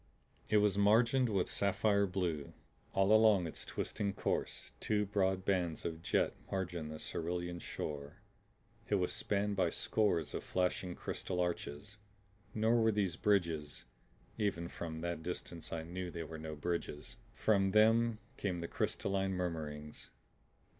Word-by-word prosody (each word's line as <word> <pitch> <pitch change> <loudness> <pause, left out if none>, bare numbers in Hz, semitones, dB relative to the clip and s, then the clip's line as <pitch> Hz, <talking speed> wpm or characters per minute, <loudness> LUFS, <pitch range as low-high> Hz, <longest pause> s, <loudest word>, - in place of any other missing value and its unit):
It 110 - +5
was 105 -1 +3
margined 115 +5 +4
with 95 -4 0
sapphire 100 0 +2
blue. 90 -6 -2 0.4
All 95 +2 +4
along 110 -4 +6
its 80 - -5
twisting 100 -1 -2
course - - -2
two 105 -1 +1
broad 95 -2 +1
bands 90 -5 0
of 80 -1 -3
jet - - +1 0.2
margined 90 -5 -2
the 80 - -6
cerulean 85 +2 -2
shore. 75 -3 -5 0.7
It 105 - +3
was 90 -2 +1
spanned 105 0 0
by 90 -3 +3
scores 85 -6 +1
of - - -3
flashing 90 -1 -1
crystal 90 -1 -4
arches. 90 +2 -3 0.6
Nor 115 +2 +3
were 110 0 +4
these 100 -5 0
bridges 85 -8 0 0.5
even 85 -5 0
from 80 -1 -5
that 85 -1 -2
distance 85 0 -5
I 80 -1 -3
knew 90 +2 -5
they 85 -1 -5
were 80 0 -7
no 80 -1 -5
bridges. 75 -1 -3 0.2
From 100 -3 +3
them 110 +2 +4 0.2
came 90 -4 -1
the 85 - -3
crystalline 95 +2 0
murmurings. 75 -4 -4
90 Hz, 140 wpm, -35 LUFS, 85-100 Hz, 0.7 s, along